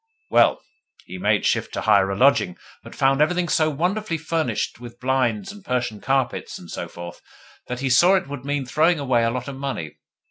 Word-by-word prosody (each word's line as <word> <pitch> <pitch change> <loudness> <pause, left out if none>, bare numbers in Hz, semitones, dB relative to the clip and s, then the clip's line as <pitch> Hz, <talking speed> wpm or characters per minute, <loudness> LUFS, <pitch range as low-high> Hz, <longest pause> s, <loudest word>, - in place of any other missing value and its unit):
Well, - - +4 0.4
he 90 +1 -8
made - - +1
shift - - 0
to - - -2
hire 100 -3 +4
a 100 - -2
lodging, 130 -9 +3 0.3
but - - -12
found 135 +1 +2
everything 180 +3 +2
so 155 -1 +2
wonderfully 175 +4 -1
furnished 155 -9 -2
with 120 0 -11
blinds 130 - 0
and 205 -1 -13
Persian 125 - -2
carpets 135 -2 -1
and - - -12
so - - -5
forth 85 0 -10 0.5
that 125 0 -5
he 135 - 0
saw 175 +9 +6
it 190 -1 0
would 140 -2 -7
mean 145 -1 -2
throwing 160 +6 +2
away 130 -4 +1
a 115 - +2
lot 125 +2 -4
of 140 -1 -6
money. 135 - -5
135 Hz, 200 wpm, -23 LUFS, 120-155 Hz, 0.5 s, saw